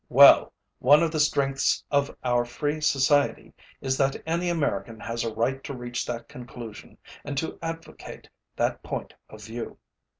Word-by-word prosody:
ö - - -54
Well, - - +8 0.3
one 145 +5 +6
of 165 - +1
the 155 - -1
strengths 140 -2 +2
of 140 -1 +1
our 120 -1 +2
free 145 +6 -3
society 145 -1 +2 0.3
is 130 0 0
that 135 0 +2
any 170 +2 0
American 115 - -1
has 115 +2 -3
a 115 - -2
right 125 +5 -1
to 140 - -5
reach 120 -1 -4
that 115 -1 -5
conclusion 120 -3 -10 0.3
and 140 - -5
to 160 - -3
advocate 165 0 -7 0.3
that - - 0
point - - -5 0.2
of 110 0 -12
view. 115 +2 -6
135 Hz, 165 wpm, -26 LUFS, 120-145 Hz, 0.3 s, Well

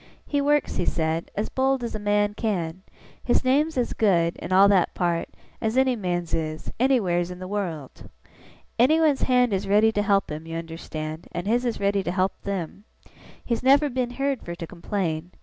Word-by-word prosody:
'He 285 -1 0
works,' 295 +1 +1
he 175 - 0
said, 160 0 -1
'as 210 - -2
bold 265 -1 +1
as 235 - -4
a 215 - -4
man 205 0 +1
can. 185 -6 -2 0.4
His 245 - +2
name's 285 +4 +2
as 245 - 0
good, 175 -6 +2
in - - -7
all 195 +2 +7
that 195 -4 +3
part, 170 -2 -1 0.3
as 220 +3 -1
any 260 -1 +3
man's 175 -5 -3
is, 155 -1 -3
anywheres 190 -10 +2
in 180 - -7
the 185 0 -7
wureld. 175 -9 -5 0.7
Anyone's 305 +2 +4
hand 250 -3 +3
is 190 0 -1
ready 210 +3 +4
to 205 - 0
help 200 -3 +1
him, 155 +2 -6
you 165 0 -4
understand, 160 -1 -6
and 175 - -4
his 240 +4 +1
is 235 - -1
ready 200 0 +1
to 175 - -3
help 185 +1 +1
them. 195 0 -4 0.6
He's 235 -2 -1
never 280 +2 +4
been 250 -1 -1
heerd 275 +1 -2
fur 170 - -6
to 170 -1 -6
complain. 170 -1 -3
200 Hz, 190 wpm, -25 LUFS, 175-245 Hz, 0.7 s, all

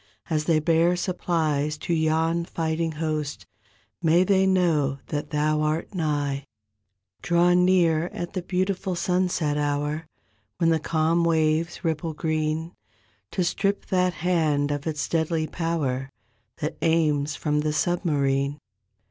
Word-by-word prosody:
As 155 -1 +1
they 165 -1 +3
bear 165 +3 +3
supplies 155 -5 -1
to 170 - -2
yon 160 +1 +1
fighting 165 -1 -2
host, 155 -2 -3 0.6
May 170 +2 +4
they 190 0 +3
know 160 -7 +2
that 145 -1 -3
Thou 150 0 +1
art 155 +5 -1
nigh. 145 -5 -1 0.8
"Draw 175 0 +3
near 175 -3 +3
at 175 -1 -6
the 185 - -2
beautiful 185 +1 -1
sunset 175 -4 0
hour 145 +2 -1 0.5
When 165 -1 +3
the 160 - +2
calm 160 +2 +1
waves 160 +1 +1
ripple 160 0 -1
green. 155 +1 -1 0.6
To 185 - -1
strip 200 +3 0
that 180 -2 +2
hand 155 -4 +1
of 145 +1 -3
its 155 -2 -2
deadly 160 -1 0
power 150 -6 -2 0.5
That 150 - -3
aims 155 -3 +2
from 150 -1 0
the 150 0 0
submarine. 145 -5 0
160 Hz, 130 wpm, -25 LUFS, 150-175 Hz, 0.8 s, May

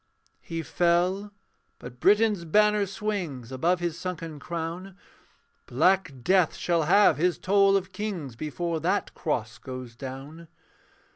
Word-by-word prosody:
He 165 -1 -5
fell: 180 +7 +1 0.5
but 125 0 -11
Britain's 205 - +3
banner 210 +4 +3
swings 180 - -4
Above 170 +8 +1
his 170 -1 -2
sunken 165 -4 -5
crown. 170 +4 -5 0.7
Black 180 +6 +2
death 185 -1 +3
shall 170 -3 0
have 190 -3 +5
his 175 +3 +1
toll 195 0 +4
of 190 -1 -5
kings 185 - -5
Before 160 +5 -3
that - - -1
cross - - -3
goes 130 -2 -8
down. 135 +6 -8
170 Hz, 125 wpm, -27 LUFS, 150-195 Hz, 0.7 s, have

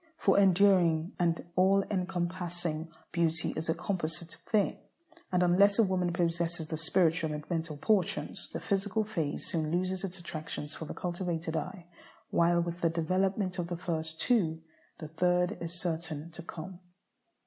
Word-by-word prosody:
For 200 -8 +4
enduring 185 -4 +4
and 170 -1 +1
all 195 +2 +5
encompassing 175 -3 -2 0.2
beauty 165 -2 +1
is 160 +1 -3
a 160 - +2
composite 170 -2 -3 0.2
thing, 210 -3 +2 0.5
and 180 -1 +3
unless 195 +3 +5
a 230 - +6
woman 185 -3 +1
possesses 170 -1 -1
the 160 - -3
spiritual 165 -1 +2
and 150 0 -6
mental 160 -3 -2
portions, 200 +4 0
the - - -3
physical 200 +2 0
phase 170 -9 -2
soon 160 -2 -1
loses 185 +2 0
its 190 -1 -4
attractions 155 -3 -5
for 160 - -6
the - - -6
cultivated 175 -2 -2
eye; 185 +1 -4 0.5
while 170 0 +4
with 170 0 -4
the 165 - +3
development 185 +3 0
of 170 - -1
the 175 0 -3
first 160 -2 -3
two, 165 -10 +2 0.3
the 155 - -7
third 180 +4 +1
is 170 +1 -4
certain 165 -2 -3
to 170 - -9
come. 175 +2 -8
175 Hz, 155 wpm, -31 LUFS, 165-185 Hz, 0.5 s, a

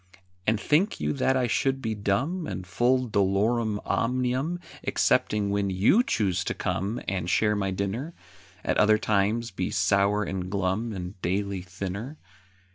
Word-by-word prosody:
And 110 0 +3
think 155 - +2
you - - 0
that 135 -1 +1
I 130 - +2
should 135 +3 +1
be 115 -4 -2
dumb, 135 - -1
And 90 - -5
full 125 +7 +1
dolorum 105 +2 +1
omnium, 130 +7 0 0.2
Excepting 105 -1 +1
when 100 -1 0
you 95 - +4
choose 95 - 0
to - - -2
come 100 +5 -2
And 90 -3 -2
share 105 +3 +2
my 100 -1 -1
dinner? 100 - -3 0.5
At - - 0
other 110 0 +5
times 110 +2 0
be 95 -1 -2
sour 100 +1 +2
and 95 -2 -4
glum 100 +4 -1
And 90 -1 -7
daily 100 +1 -1
thinner? 100 - -6
105 Hz, 150 wpm, -27 LUFS, 95-125 Hz, 0.5 s, other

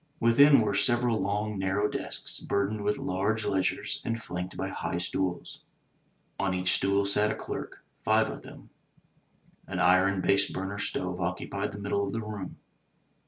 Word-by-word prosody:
Within 140 +3 +6
were 105 -2 0
several 120 +3 +2
long, 105 +1 -1
narrow 95 +2 +1
desks - - -1
burdened 100 +1 -1
with 105 0 +1
large 105 +4 -1
ledgers 95 -1 -1
and 115 0 -2
flanked 90 -4 -5
by - - -2
high - - -3
stools. 90 +1 -3 0.8
On 95 -2 0
each 90 0 +2
stool 100 +1 +2
sat 105 +2 +2
a - - -1
clerk - - -6
— - - -41
five - - +3
of - - -6
them. - - -13 1.0
An 95 - -4
iron 95 +2 +4
"base 100 +1 +3
burner" 95 +2 -4
stove 90 -2 -2
occupied 90 +3 -2
the 100 - -8
middle 100 0 -1
of 100 - -3
the 115 - -2
room. 105 -3 -6
100 Hz, 165 wpm, -28 LUFS, 95-105 Hz, 1.0 s, Within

